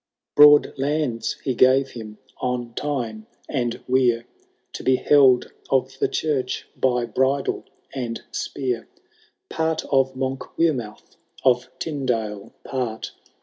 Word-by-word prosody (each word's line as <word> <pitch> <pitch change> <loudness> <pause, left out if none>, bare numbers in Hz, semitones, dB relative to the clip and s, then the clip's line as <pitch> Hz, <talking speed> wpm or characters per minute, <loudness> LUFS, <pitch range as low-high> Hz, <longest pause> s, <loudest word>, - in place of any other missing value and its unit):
* - - -66
VI. - - +4
Broad 150 0 +8
lands 140 -4 -1
he 130 - 0
gave 130 +2 +4
him 110 -3 -9 0.2
on 125 -2 -3
Tyne 115 -7 -3 0.2
and 120 -5 -2
Wear, 125 -2 +2 0.5
To - - -6
be 130 - +4
held 130 -2 +4 0.2
of 135 0 0
the - - +2
church 140 -5 -2
by 125 -2 +1
bridle 130 +4 0 0.3
and 120 -4 -3
spear; 125 -4 -3 0.6
Part 160 0 -1
of 135 -1 +3
Monkwearmouth, 130 -2 -2 0.3
of 125 -1 +3
T3medale 115 -9 -3
part. 125 -4 -3
130 Hz, 120 wpm, -23 LUFS, 120-135 Hz, 0.6 s, Broad